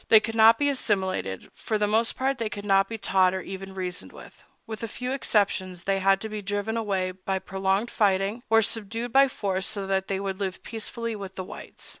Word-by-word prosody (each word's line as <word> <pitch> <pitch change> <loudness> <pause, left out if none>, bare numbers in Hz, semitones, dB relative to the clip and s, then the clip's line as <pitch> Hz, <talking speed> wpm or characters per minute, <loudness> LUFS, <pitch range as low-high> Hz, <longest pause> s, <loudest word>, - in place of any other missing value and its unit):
They 220 - +9
could 225 +1 -4
not 225 0 +7
be 290 - +2
assimilated; 190 - -1
for 215 - -2
the 210 - +2
most 220 +2 +2
part 265 0 0
they 225 -2 -1
could 205 -1 -7
not 195 -1 +4
be 225 - -4
taught 190 -3 +3
or 190 - -2
even 190 +1 -7
reasoned 180 -1 -4
with; - - -14 0.2
with 220 -1 -6
a 230 - -2
few 250 +3 -4
exceptions 190 -8 0
they 195 0 +1
had 195 0 +4
to 220 - -3
be 215 -1 -4
driven 205 +2 -2
away 195 -5 0
by 190 +1 -3
prolonged 195 +4 -1
fighting, 200 +2 +1
or 225 0 +5
subdued 225 +3 -3
by 275 +1 +7
force 195 -7 -2
so 205 -3 -3
that 190 0 0
they 195 -1 -1
would 195 -1 -3
live 190 -2 -3
peaceably 230 0 -4
with 195 -2 -7
the 185 - -4
whites. - - -9
200 Hz, 220 wpm, -26 LUFS, 190-225 Hz, 0.2 s, They